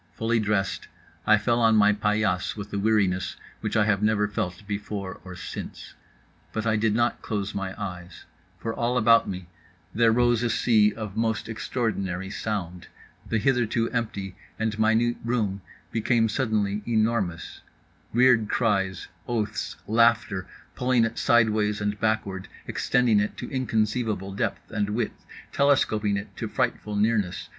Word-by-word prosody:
Fully 115 +1 +1
dressed, 105 -2 -1 0.4
I 110 0 +7
fell 115 +3 +1
on 115 -1 +5
my 105 -1 +5
paillasse 105 -3 0
with 105 0 -7
a 100 - 0
weariness 100 -3 +1 0.2
which - - -2
I 105 - +4
have 105 -2 +2
never 105 -1 +2
felt 95 -1 -4
before 100 -2 -5
or 95 -1 -9
since. 85 - -7 0.6
But 110 0 -3
I 110 -1 +2
did 105 0 +1
not 120 +1 +1
close 100 -2 -3
my 95 0 -4
eyes: 90 -4 -7 0.3
for 115 +5 -4
all 120 +2 0
about 115 0 +5
me 90 -1 -5 0.5
there 115 0 +4
rose 120 0 +3
a 120 - +1
sea 110 -2 +4
of 105 -3 -7
most 110 -1 -1
extraordinary 100 -5 -2
sound… 95 -5 -4 0.4
the 115 - +1
hitherto 115 -1 +1
empty 100 -5 -3 0.2
and 110 -1 -2
minute 110 +2 +3
room 110 -5 -1 0.3
became 115 0 +2
suddenly 105 -4 0
enormous: 110 -7 0 0.5
weird 120 -3 +4
cries, 95 -5 0 0.2
oaths, 110 -3 -2
laughter, 115 -3 +2 0.3
pulling 125 -2 +2
it 115 0 -4
sideways 110 -3 +3
and 105 0 -2
backward, 100 -4 -1 0.2
extending 125 -4 +2
it 105 - -2
to - - -6
inconceivable 110 -5 -1
depth 100 - -3
and 105 -1 -1
width, 110 +4 -3 0.3
telescoping 110 -7 +2
it 100 - -7
to - - -3
frightful 105 -1 -1
nearness. 105 -3 0
110 Hz, 145 wpm, -26 LUFS, 100-115 Hz, 0.6 s, I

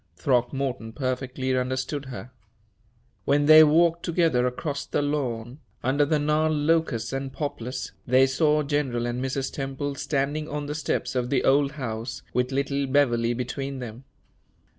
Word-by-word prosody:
Throckmorton 125 -1 -1
perfectly 130 0 -2
understood 130 +3 -2
her. 125 -1 -8 0.9
When 145 +1 +3
they 155 +1 +9
walked 165 +2 +4
together 165 -8 +2
across 140 +3 -3
the - - -1
lawn, 130 -3 -3 0.2
under 140 +3 +2
the 155 0 +2
gnarled 150 +1 +1
locusts 150 -6 +1
and 135 0 -3
poplars, 125 -4 -4 0.2
they 130 +2 +5
saw 150 +3 +2
General 140 -5 -1
and 120 +1 -2
Mrs. 135 0 -2
Temple 135 +1 -3
standing 145 +2 -2
on 145 0 -3
the 145 - -4
steps 150 0 -2
of 125 -1 -1
the 130 -2 +1
old 140 +1 +3
house, 115 -4 -5
with 125 +1 0
little 140 0 -1
Beverley 120 -4 +2
between 135 +3 -4
them. 125 +1 -8
135 Hz, 145 wpm, -25 LUFS, 125-145 Hz, 0.9 s, they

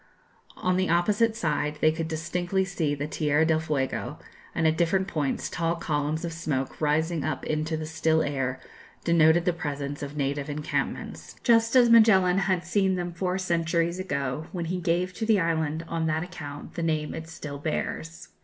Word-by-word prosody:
On 185 0 +1
the 185 -1 +1
opposite 210 +6 +2
side 150 -7 -1
they 155 - +4
could 160 0 -3
distinctly 175 +4 -1
see 165 -6 -1
the 145 +1 -3
Tierra 150 0 +1
del 160 -1 +3
Fuego, 150 -4 -2 0.4
and 165 - +1
at 160 0 +4
different 175 +3 +1
points 150 -7 -1
tall 165 -1 -1
columns 155 0 -1
of 165 - -4
smoke 150 -5 -3
rising 155 +1 +1
up 155 - -3
into 155 +1 -1
the 155 - -4
still 160 0 +1
air 135 -2 -2 0.4
denoted 170 0 +4
the 180 - +2
presence 145 -3 -4
of 145 +1 -6
native 140 +1 -1
encampments, 150 +1 -3
just 230 0 +4
as 240 -2 +6
Magellan 195 -5 +6
had 185 -2 0
seen 190 +1 +2
them 175 -1 -3
four 180 +1 -1
centuries 170 -1 0
ago, 140 -4 -2
when 175 -2 -3
he 180 +2 -2
gave 180 +1 0
to 220 - -5
the 220 -3 +4
island, 160 -1 0
on 165 -1 -1
that 155 +1 0
account, 145 -5 -8
the - - -4
name 155 -2 -1
it 160 0 -7
still 145 -3 -7
bears. 160 +2 -4
165 Hz, 180 wpm, -27 LUFS, 150-180 Hz, 0.4 s, as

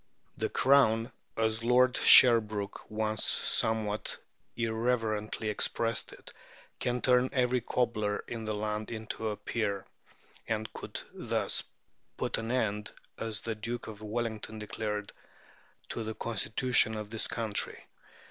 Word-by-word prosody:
The - - -1
Crown, 125 -3 +4 0.3
as 110 0 0
Lord 125 +2 +4
Sherbrooke 110 -5 +5
once 110 0 -1
somewhat 110 -1 +1 0.4
irreverently 110 -2 -1
expressed 115 +2 0
it, - - -12 0.5
"can 125 0 -1
turn 125 0 +4
every 125 -2 +2
cobbler 110 -4 0
in 115 -1 -5
the 110 -1 -2
land 105 0 -3
into 110 -1 -4
a 105 - -4
peer," 100 -4 -2 0.6
and 110 0 -2
could - - -6
thus - - 0 0.6
put - - -1
an 115 0 -4
end, 105 -4 -1 0.3
as 110 -2 -3
the 115 - -2
Duke 115 +3 -5
of 110 -1 -9
Wellington 110 0 -3
declared, 105 -1 -4 0.8
to 115 - -3
"the 110 0 -4
Constitution 110 +1 +2
of 105 0 -6
this 110 - +1
country." 110 -3 -2
110 Hz, 125 wpm, -30 LUFS, 105-115 Hz, 0.8 s, Sherbrooke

